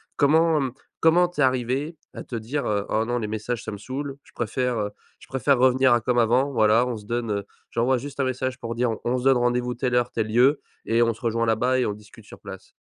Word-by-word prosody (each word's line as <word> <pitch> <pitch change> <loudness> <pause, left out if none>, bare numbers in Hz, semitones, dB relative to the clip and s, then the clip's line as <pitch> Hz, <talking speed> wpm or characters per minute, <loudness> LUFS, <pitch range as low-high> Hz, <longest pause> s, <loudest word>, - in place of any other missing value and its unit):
comment 160 +2 +4
hem, 130 -3 -1 0.3
comment 175 +2 +4
tu 175 -4 -4
es - - +5
arrivé 130 +5 0 0.2
à - - -7
te 120 - -7
dire, 120 +6 -3
heu: 100 -1 0
«Oh 110 +1 +1
non, 120 +1 -1
les 110 -3 -3
messages 110 +2 -4
ça - - -5
me 100 - -6
saoule, 135 +4 -5
je - - -21
préfère, 125 +1 -1
heu, 105 0 -2 0.3
je - - -16
préfère 135 +1 +1
revenir 130 +1 +4
à 120 - +2
comme 120 +1 +1
avant, 125 +5 +2
voilà 110 0 +4
on 125 -2 -3
se 105 - -12
donne, 115 -1 -2
heu 100 -1 -1 0.3
j'envoie 125 +3 +2
juste 140 +3 -8
un 135 - +2
message 130 0 -2
pour 115 0 -5
dire 120 0 +1
on 110 - -5
on 125 +2 0
se 125 - -4
donne 135 -1 +4
rendez-vous 120 0 0
telle 125 0 -1
heure, 120 0 +1
tel 110 -2 -1
lieu 125 +6 +3 0.2
et 115 +1 +2
on 115 -2 +2
se - - -19
rejoint 115 -1 0
là-bas 125 +4 +2
et 125 - +1
on 105 - -2
discute 105 0 -15
sur - - -13
place»? - - -11
125 Hz, 260 wpm, -24 LUFS, 115-130 Hz, 0.3 s, es